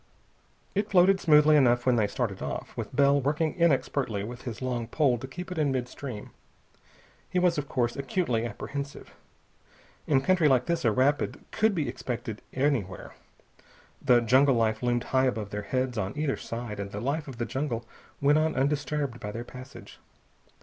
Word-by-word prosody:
It 205 +1 -1
floated 190 0 +5
smoothly 150 -2 +6
enough 120 -4 +4
when 125 -1 +4
they 110 -3 +2
started 100 -2 -3
off, - - -5
with - - -6
Bell 140 0 +4
working 150 +3 0
inexpertly 135 - +1
with 120 +3 -7
his 115 -4 -5
long 125 -3 -2
pole 125 -2 +2
to 130 - -7
keep 180 +7 -8
it 180 - -3
in 145 -3 +2
mid 125 -2 -1
stream. 125 -4 -8 1.0
He - - -2
was, 180 -3 +3
of 145 - -6
course, 120 -2 0
acutely 135 -4 -1
apprehensive. 140 +5 -6 0.9
In 135 -3 +3
country 175 +1 +3
like 130 -3 +3
this 170 0 -1
a 115 - +5
rapid 135 +6 +1
could 220 -1 +2
be 155 -5 -1
expected 120 -3 -5
anywhere. 130 -9 -1 0.9
The 125 -4 +5
jungle 130 +4 +4
life 110 -1 +1
loomed 120 -1 +1
high 130 0 +2
above 110 -5 -3
their 105 - -3
heads 130 +2 -1
on 100 +6 -3
either 150 -2 0
side, 115 -3 -6
and 100 0 -4
the 100 - -5
life 140 +6 -2
of 130 -4 -8
the 120 - -2
jungle 120 -2 -3 0.3
went 145 +2 +4
on 155 0 +1
undisturbed 140 -2 -1
by 105 - -5
their 115 +3 -6
passage. 130 +1 -12
130 Hz, 175 wpm, -28 LUFS, 120-150 Hz, 1.0 s, smoothly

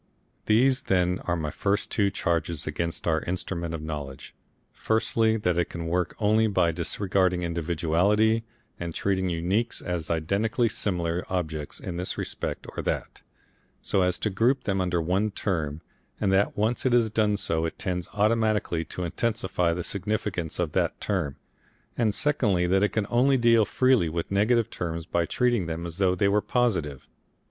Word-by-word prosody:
These 125 +4 +4
then 90 -1 +2
are 85 - +1
my 80 -3 -3
first 100 +1 -1
two 100 -2 +2
charges 85 -4 -1
against 80 +2 -3
our 80 -2 +2
Instrument 85 -2 -3
of 75 - -6
Knowledge, 75 -4 -6 0.4
firstly, 110 0 +1
that 90 -5 0
it 85 - 0
can 85 -1 -5
work 90 +1 -1
only 110 +1 +3
by 90 -5 +2
disregarding 90 +1 0
individuality 85 +7 +1 0.4
and 85 -1 -5
treating 95 -1 0
uniques 95 +8 -1
as 85 -4 -4
identically 100 +9 +1
similar 90 -4 -1
objects 80 -5 -3
in 85 - -5
this 90 +1 -3
respect - - -4
or - - -2
that, - - -3 0.6
so 95 - +1
as 90 -1 +2
to 105 - -1
group 125 +7 +2
them 95 -2 0
under 90 -1 0
one 95 +6 +1
term, 80 -7 -2 0.4
and 95 -2 +1
that 100 +2 +2
once 110 +4 0
it 130 - +2
has 115 -3 +3
done 105 -2 +2
so 80 -4 0
it 80 - -4
tends 90 0 -3
automatically 105 -5 +1
to 90 - -6
intensify 90 -2 0
the 85 +1 -2
significance 100 -4 -2
of 85 -4 -1
that - - 0
term, 85 -9 -1 0.6
and 110 -4 +1
secondly, 105 -12 +2
that 95 +2 +2
it 105 - +3
can 110 -2 -1
only 130 +3 +4
deal 115 -2 +4
freely 130 -6 +3
with 85 +3 -4
negative 110 +3 +2
terms 85 -1 -4
by 85 -1 0
treating 120 -8 +1
them 85 +1 -4
as 85 +2 -7
though 95 -2 +3
they 100 +2 +2
were 105 +1 +3
positive. 90 - -1
95 Hz, 170 wpm, -26 LUFS, 85-110 Hz, 0.6 s, These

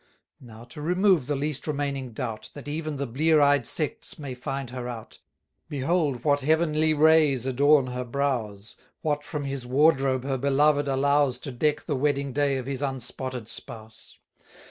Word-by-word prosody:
Now, 115 -3 -13
to 120 +5 -11
remove 180 -3 +2
the 145 - 0
least 145 +1 -2
remaining 140 -3 -2
doubt, 110 -1 -5
That 145 0 -9
even 155 0 -3
the 140 - -2
blear 155 +6 +2
eyed 145 -4 +3
sects 155 -3 0
may 140 -4 -6
find 125 0 -5
her 125 -1 -5
out, 115 -3 -9 0.5
Behold 145 -3 0
what 145 -1 +3
heavenly 155 +1 +2
rays 150 -4 +4
adorn 140 +2 +4
her 125 0 -4
brows, 120 -6 -3 0.3
What 150 -1 -1
from 150 -1 -5
his 135 -2 -4
wardrobe 135 0 +2
her 135 -1 -2
beloved 145 +2 +2
allows 140 -1 +2
To 140 - -5
deck 150 +4 0
the 145 - -1
wedding 140 0 0
day 140 -1 +1
of 130 - -5
his 135 0 -3
unspotted 130 -3 -3
spouse. 110 -2 -7
140 Hz, 165 wpm, -26 LUFS, 125-150 Hz, 0.5 s, rays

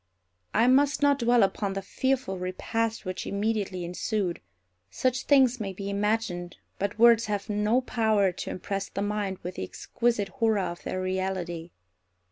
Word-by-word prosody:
I 225 - +5
must 275 +3 +4
not 285 -1 +4
dwell 240 -1 +4
upon 195 0 0
the 195 0 -4
fearful 260 -4 -1
repast 225 +5 -2
which 185 0 -4
immediately 200 -3 -1
ensued. 180 +1 -2 0.5
Such 255 - -1
things 260 -3 +4
may 195 -3 -3
be 200 +1 -5
imagined, 200 -4 -1 0.2
but 200 +1 -2
words 230 -1 +6
have 205 0 -2
no 210 +4 +2
power 220 -6 +2
to 175 - -6
impress 195 +1 -4
the 200 - -3
mind 205 -2 -2
with 180 +1 -6
the - - -3
exquisite 230 - -1
horror 225 -5 +1
of 175 -3 -3
their 185 - -3
reality. 185 -3 -2
205 Hz, 155 wpm, -27 LUFS, 185-230 Hz, 0.5 s, words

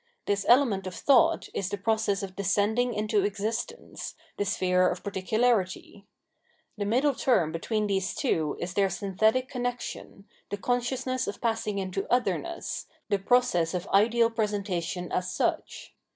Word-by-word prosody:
This 200 -1 -1
element 235 -7 +4
of 180 - -6
thought 275 -3 +4
is 190 - -2
the 205 - -3
process 210 -1 0
of 190 -1 -6
descending 210 +5 +1
into 210 -1 +1
existence, 220 - -4 0.2
the 205 - -1
sphere 185 -3 +2
of 180 - -4
particularity. 200 0 0 0.7
The 205 -2 -3
middle 265 +7 +3
term 175 -15 +2
between 210 +6 -1
these 190 -2 -1
two 160 - 0
is 175 +1 -4
their 195 0 +2
synthetic 220 +7 +1
connexion, 245 -5 -5 0.2
the 205 - -3
consciousness 250 +3 -1
of 200 - -4
passing 225 -3 -1
into 195 0 -3
otherness, 340 +7 -1 0.2
the 200 - +2
process 190 -6 +2
of 180 - -3
ideal 230 +3 +4
presentation 195 -5 -2
as 185 0 -1
such. - - -2
205 Hz, 140 wpm, -28 LUFS, 190-240 Hz, 0.7 s, element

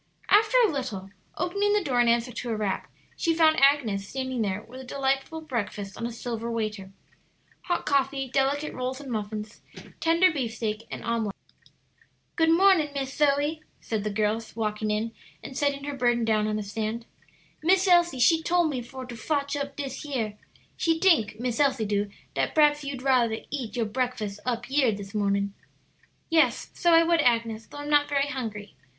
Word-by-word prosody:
After 435 +4 +5
a 410 - +1
little, 220 -9 -4 0.3
opening 400 +4 +1
the 420 -2 +2
door 255 -6 0
in 240 - +3
answer 235 +1 +2
to 240 +1 -5
a 225 - 0
rap, 210 -3 -2 0.2
she 330 -2 +1
found 315 -3 +4
Agnes 240 -9 +3
standing 260 -1 -3
there 205 0 -2
with 255 +3 -11
a - - -9
delightful 270 +4 -1
breakfast 210 -8 -4
on 230 - -3
a - - -6
silver 230 0 -4
waiter 215 -4 -3 0.7
hot 350 - -1
coffee, 275 -1 +1
delicate 275 +3 0
rolls 255 +1 -3
and 275 -3 -8
muffins, 210 0 -5 0.4
tender 335 +3 +4
beefsteak, 225 -4 -3
and - - -6
omelet. 225 -4 -1 1.0
"Good 325 -1 +3
mornin', 340 -2 +5
Miss 270 -1 -3
Zoe," 295 +2 +1 0.2
said 220 -3 -3
the 210 - -1
girl, 215 +2 0
walking 215 -1 -2
in 215 +2 -1 0.3
and 265 - -8
setting 280 0 0
her 290 0 -4
burden 240 -2 +2
down 215 -1 +2
on 215 0 -1
a 215 - -3
stand. 220 +3 -4 0.6
"Miss 375 +4 +3
Elsie 345 -5 +4
she 320 +7 +5
tole 350 +1 +2
me 280 -5 -1
for 260 +2 -8
to 245 -1 -8
fotch 280 +4 -1
up 280 -1 -4
dis 275 -2 -5
yere. 240 -8 -3 0.4
She 330 -1 +1
tink, 225 - +3
Miss 245 0 -2
Elsie 270 -6 +2
do, 205 0 0 0.2
dat - - -1
p'raps 295 -1 +4
you'd 275 -2 -5
rather 245 -4 +3
eat 255 -6 -4
yo' 235 -2 0
breakfus 215 -3 -2
up 240 -2 -2
yere 265 -4 +2
dis 200 -1 -8
mornin'." 200 -1 0 0.7
"Yes, 325 -1 +2
so 345 - +2
I 330 0 +7
would, 335 -1 +3
Agnes, 230 -3 +1
though - - -11
I'm 290 0 -6
not 290 0 +4
very 280 0 +1
hungry. 220 -7 -5
255 Hz, 180 wpm, -26 LUFS, 220-290 Hz, 1.0 s, I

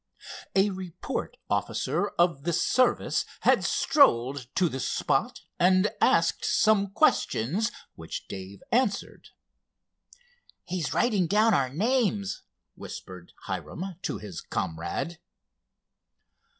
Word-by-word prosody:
A 195 +1 +4
report 185 -3 -5
officer - - -1
of 170 -5 +2
the 170 +3 -1
service 255 +9 +2 0.2
had - - +4
strolled 130 - +3
to 185 - +3
the 135 -4 -4
spot, - - -1 0.2
and 185 +3 +4
asked - - +3
some 215 -2 +3
questions 200 - +1 0.2
which 80 - -7
Dave 95 +1 -8
answered. 235 -5 0 1.3
"He's 175 -4 -3
writing 205 -8 +2
down 215 +5 +4
our 135 -7 +2
names," 205 - 0 0.3
whispered 90 -2 -10
Hiram 185 +2 -5
to - - -3
his 100 -5 -8
comrade. 85 - -4
180 Hz, 100 wpm, -27 LUFS, 130-210 Hz, 1.3 s, A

